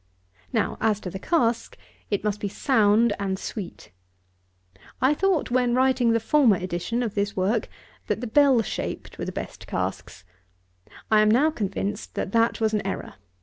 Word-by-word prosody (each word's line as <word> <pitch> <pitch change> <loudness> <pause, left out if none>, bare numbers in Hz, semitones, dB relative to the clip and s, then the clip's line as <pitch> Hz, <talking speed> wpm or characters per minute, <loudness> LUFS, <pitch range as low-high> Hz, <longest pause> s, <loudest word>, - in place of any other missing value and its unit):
Now, - - -1
as 215 -2 +2
to 180 - -6
the 190 - -6
cask, 235 - 0 0.3
it 205 -2 -1
must 210 -1 -1
be 205 - -2
sound 220 -1 +3
and 190 -1 -1
sweet. 195 - -7 1.1
I 260 +3 +4
thought, 360 -4 0
when 245 -1 +2
writing 255 -2 +3
the 230 - +3
former 240 -2 +4
edition 185 +7 -2
of 220 -4 -3
this 205 0 -1
work, 205 +4 0 0.4
that 210 - -1
the 245 - -4
bell 265 0 +4
shaped - - -5
were - - -3
the - - -4
best - - -7
casks. - - -4 0.9
I 215 -1 +6
am 215 - +4
now 275 +8 +4
convinced 205 -3 -4
that - - -3
that 230 +1 +2
was 220 -1 +1
an 210 - +1
error. 195 - -4
220 Hz, 170 wpm, -25 LUFS, 205-245 Hz, 1.1 s, I